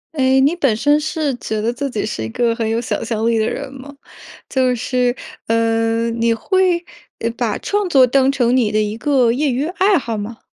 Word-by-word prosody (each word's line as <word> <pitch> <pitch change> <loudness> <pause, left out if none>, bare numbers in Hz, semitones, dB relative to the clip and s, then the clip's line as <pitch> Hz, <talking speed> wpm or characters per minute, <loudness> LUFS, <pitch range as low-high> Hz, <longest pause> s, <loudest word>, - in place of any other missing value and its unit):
哎， 265 -1 +3
你 285 +4 +3
本 270 -10 +2
身 290 +6 +2
是 310 -2 -2
觉 220 -3 -4
得 225 +2 0
自 275 +3 -4
己 220 -5 -3
是 210 - -4
一 110 - -3
个 230 - 0
很 230 -1 -2
有 225 +1 0
想 245 - -3
象 225 -1 -2
力 230 -1 +2
的 220 - +1
人 - - -5
吗？ 275 +2 -11 0.5
就 255 -1 +1
是， 245 +1 0 0.3
嗯， 230 0 0
你 230 0 +2
会， 360 - +1 0.4
呃， 230 - -1
把 230 -4 -1
创 410 -1 -1
作 270 -6 +5
当 265 +1 +2
成 250 -3 +1
你 225 -5 +1
的 215 - +2
一 210 +1 -3
个 255 -2 +2
业 280 +5 0
余 260 +3 -1
爱 380 +3 +2
好 230 -6 -3
吗？ 215 +3 -7
245 Hz, 225 characters per minute, -18 LUFS, 225-280 Hz, 0.5 s, 作